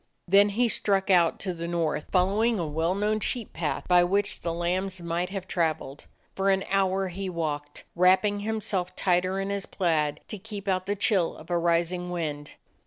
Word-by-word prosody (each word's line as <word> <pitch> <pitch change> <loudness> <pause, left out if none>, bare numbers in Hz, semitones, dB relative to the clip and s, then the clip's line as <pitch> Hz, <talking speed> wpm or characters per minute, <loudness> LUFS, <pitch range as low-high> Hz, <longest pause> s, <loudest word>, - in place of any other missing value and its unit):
Then 200 +3 +5
he 235 +4 +1
struck 195 -3 +1
out 175 -3 +4
to 185 -2 -2
the 170 0 -5
north, 165 -3 -1
following 205 +5 +2
a 170 - -1
well 160 +4 -1
known 210 +2 0
sheep 235 0 -2
path 165 -2 -3
by 180 -1 +5
which 200 +3 0
the 170 - -2
lambs 180 +3 -1
might 170 +1 -2
have 190 -1 -5
traveled. 155 -5 -2 0.3
For 195 +1 +1
an 190 0 +2
hour 195 -1 +1
he 190 +2 -5
walked, 150 -4 -4
wrapping 190 +3 +3
himself 205 -4 -2
tighter 185 +1 +1
in 195 +1 -2
his 200 -1 -3
plaid 155 -5 0
to 210 - -5
keep 205 0 -8
out 185 -1 0
the 205 - 0
chill 195 -4 +2
of 160 +3 -11
a 175 - +2
rising 170 +1 0
wind. 150 -4 -4
185 Hz, 185 wpm, -27 LUFS, 170-200 Hz, 0.3 s, Then